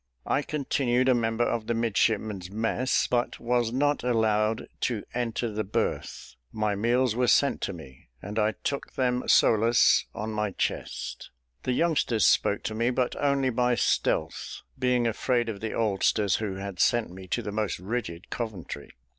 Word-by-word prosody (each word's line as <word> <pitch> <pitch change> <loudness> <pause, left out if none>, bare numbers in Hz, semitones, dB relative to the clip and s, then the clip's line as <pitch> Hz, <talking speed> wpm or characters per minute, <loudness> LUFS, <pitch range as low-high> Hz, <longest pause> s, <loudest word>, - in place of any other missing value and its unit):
I 140 - +1
continued 135 -4 0
a - - +6
member 115 -1 +1
of 110 -2 -2
the 120 - 0
midshipmen's 110 -4 0
mess, 115 +5 0
but 120 -1 -1
was 120 -1 0
not 145 +2 +1
allowed 110 -2 +1
to 115 -5 -1
enter 120 -1 -2
the 110 +1 -2
berth: 95 -8 -3 0.2
my 105 -1 0
meals 120 +3 +1
were 125 0 +1
sent 140 +3 +3
to - - -2
me, 65 -8 -13
and 105 +7 -4
I 110 0 +2
took 140 - -3
them 125 -1 0
solus 115 +2 +5
on 110 +1 -4
my 105 -2 -2
chest. - - -4 0.3
The 130 - -1
youngsters 135 - +2
spoke - - +3
to 110 - -3
me, 115 +2 +1
but 125 -1 0
only 140 -2 +2
by 125 0 +2
stealth, - - -1 0.2
being 125 -2 +2
afraid 120 +1 0
of 105 -3 -5
the 110 0 -4
oldsters, 105 -2 +1
who 105 -3 -3
had 95 -2 -6
sent 120 -4 +2
me 95 +1 -10
to - - -2
the 105 - -4
most 105 -1 -1
rigid 95 -3 -5
Coventry. 95 - -5
115 Hz, 165 wpm, -27 LUFS, 105-125 Hz, 0.3 s, a